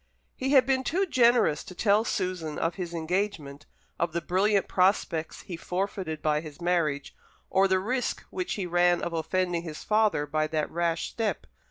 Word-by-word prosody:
He 265 - -2
had 265 -3 +7
been 265 0 +1
too 375 +8 +1
generous 240 - +3
to 180 - -11
tell 210 +2 +3
Susan 180 -8 -2
of 165 - 0
his 180 -3 -5
engagement, 165 -4 -3 0.3
of 170 -1 0
the 170 - 0
brilliant 195 +3 +2
prospects 180 -4 +1
he 180 - -6
forfeited 180 -2 -3
by 150 -1 +2
his 155 -3 -10
marriage, 170 -5 0 0.4
or 195 +1 +4
the 190 0 +3
risk 245 +7 -2
which 365 -1 -3
he 200 -4 -3
ran 175 0 +2
of 170 - -3
offending 175 +1 0
his 160 -3 -7
father 215 -8 +2
by 155 +1 0
that 155 -1 -2
rash 170 -1 -1
step. 225 -2 -2
180 Hz, 175 wpm, -27 LUFS, 160-205 Hz, 0.4 s, had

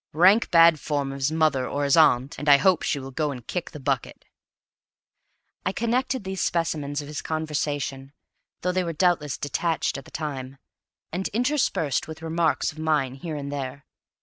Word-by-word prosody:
Rank 185 +8 +5
bad 165 -2 +6
form 140 -2 -2
of 135 - -7
his 135 +3 +1
mother 155 -5 +2
or 145 +1 -2
his 140 -1 +3
aunt, 140 -4 +4
and 145 - -1
I 140 - +9
hope 180 +4 +3
she - - 0
will 135 -1 -7
go 150 +3 -1
and 125 -4 -7
kick 180 +5 -4
the 150 - -10
bucket." 135 -3 -2 1.4
I - - 0
connect 245 +3 -1
these 190 -1 -4
specimens 150 -4 -1
of - - -10
his 150 0 -5
conversation, 145 -3 -3 0.5
though 180 - 0
they 185 0 0
were 170 -1 -3
doubtless 160 -4 +1
detached 160 0 -1
at 135 - -14
the - - -13
time, 135 -4 -5 0.5
and 185 +3 -2
interspersed 240 - 0
with 160 0 -9
remarks 165 0 +1
of 155 - -13
mine 150 -5 +1
here 155 +4 -6
and 140 -1 -5
there. 140 -1 -5
150 Hz, 180 wpm, -25 LUFS, 140-170 Hz, 1.4 s, I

